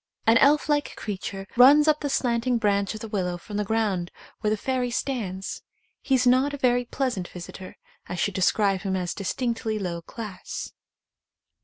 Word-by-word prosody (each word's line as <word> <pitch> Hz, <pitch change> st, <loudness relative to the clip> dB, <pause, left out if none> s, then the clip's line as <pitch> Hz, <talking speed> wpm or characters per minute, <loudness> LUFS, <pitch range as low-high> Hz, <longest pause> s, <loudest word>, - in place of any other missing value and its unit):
An 230 Hz, +1 st, +6 dB
elf 295 Hz, +2 st, +4 dB
like 295 Hz, -1 st, 0 dB
creature 195 Hz, -1 st, -5 dB
runs 285 Hz, +5 st, +7 dB
up 305 Hz, -1 st, +4 dB
the 290 Hz, -, -2 dB
slanting 245 Hz, -1 st, +1 dB
branch 200 Hz, -1 st, +1 dB
of 215 Hz, -, -8 dB
the 225 Hz, -, -5 dB
willow 185 Hz, -4 st, -2 dB
from 205 Hz, +4 st, -7 dB
the 210 Hz, -, +1 dB
ground 205 Hz, -5 st, 0 dB, 0.3 s
where 215 Hz, -, 0 dB
the 215 Hz, -, +1 dB
fairy 255 Hz, +2 st, -1 dB
stands. 215 Hz, -7 st, -3 dB, 0.4 s
He 270 Hz, -, +2 dB
is 255 Hz, -1 st, +2 dB
not 260 Hz, +3 st, +3 dB
a -, -, -7 dB
very 245 Hz, -2 st, +2 dB
pleasant 240 Hz, -8 st, -2 dB
visitor 185 Hz, +1 st, -9 dB, 0.2 s
— -, -, -29 dB
I 180 Hz, -, -3 dB
should 200 Hz, +3 st, 0 dB
describe 195 Hz, 0 st, +2 dB
him 190 Hz, 0 st, -1 dB
as 180 Hz, -2 st, -2 dB
distinctly 225 Hz, +2 st, -2 dB
low 175 Hz, -4 st, -3 dB
class. 205 Hz, +1 st, -7 dB
220 Hz, 180 wpm, -25 LUFS, 190-255 Hz, 0.4 s, runs